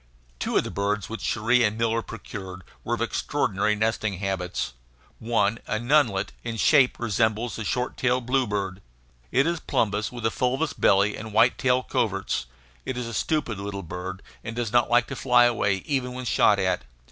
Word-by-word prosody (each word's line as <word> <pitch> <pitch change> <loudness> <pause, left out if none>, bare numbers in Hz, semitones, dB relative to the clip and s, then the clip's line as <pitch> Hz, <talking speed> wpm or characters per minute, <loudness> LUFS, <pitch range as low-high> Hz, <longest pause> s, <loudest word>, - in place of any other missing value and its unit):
Two - - 0
of - - +3
the - - -5
birds 100 0 -1
which 115 - -5
Cherrie 120 +2 +2
and 105 0 +1
Miller 115 0 +1
procured 95 -4 -8 0.2
were - - 0
of - - -2
extraordinary 105 +2 0
nesting 110 -2 -1
habits. 95 -7 -3 0.5
One, 110 -1 +1
a 110 - 0
nunlet, 120 -5 +2
in 115 -1 -4
shape 135 +2 +4
resembles 110 +1 0
a - - -3
short 125 +4 -2
tailed 125 -1 +1
bluebird. 105 -7 -1 0.5
It 135 - +3
is 170 0 0
plumbeous, 105 -5 0
with 120 -2 -6
a 115 - +2
fulvous 130 +7 0
belly 100 +2 +3
and 110 -1 -8
white 115 +3 +4
tail 130 0 +2
coverts. 95 - -1 0.4
It 130 - -4
is 125 - -3
a 115 - -6
stupid 120 -4 -1
little 100 0 -5
bird, 90 +3 -6 0.2
and 110 - -6
does 120 -3 -2
not 120 -1 +3
like 120 0 +4
to - - -6
fly 125 -2 +4
away 115 -5 +2
even 130 -3 -1
when 130 0 -6
shot 105 -3 +4
at. 95 -6 0
110 Hz, 180 wpm, -25 LUFS, 100-125 Hz, 0.5 s, shape